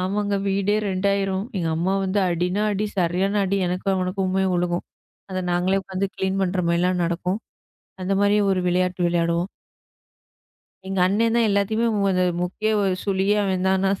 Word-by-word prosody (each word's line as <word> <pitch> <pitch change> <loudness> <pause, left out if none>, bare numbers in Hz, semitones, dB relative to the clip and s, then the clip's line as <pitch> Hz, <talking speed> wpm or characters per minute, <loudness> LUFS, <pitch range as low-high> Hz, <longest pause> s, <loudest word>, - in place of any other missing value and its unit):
ஆமாங்க. 200 +2 -1
வீடே 200 +2 +1
ரெண்டாயிரும். 195 0 0
எங்க 165 -3 -1
அம்மா 185 +4 0
வந்து 190 +2 0
அடின்னா 180 +4 0
அடி. 210 +2 -1
சரியான 185 +4 +1
அடி. 195 +1 0
எனக்கும் 185 +2 -1
அவனுக்குமே 185 +1 0
விழும். 175 0 -1 0.5
அதை 185 0 -2
நாங்களே 185 +2 +1
உக்காந்து 190 +1 -2
கிளீன் 190 +1 -1
பண்ற 185 0 -1
மாரில்லாம் 175 +1 +1
நடக்கும். 180 +4 -2 0.6
அந்த 190 +2 -1
மாரி 205 +1 +4 0.2
ஒரு 185 - 0
விளையாட்டு 180 +1 0
விளையாடுவோம். 170 +1 0 1.4
எங்க 195 -1 -2
அண்ணன் 225 +4 +1
தான் 230 -1 +3
எல்லாத்தையுமே 215 +3 +1 0.2
ஒரு 185 -1 +2 0.2
முக்கிய 215 +5 -1
ஒரு 190 -2 +1
சுலியே 195 +1 +1
அவன்தான் 190 0 +1
நான். 195 0 0
190 Hz, 150 wpm, -23 LUFS, 180-200 Hz, 1.4 s, மாரி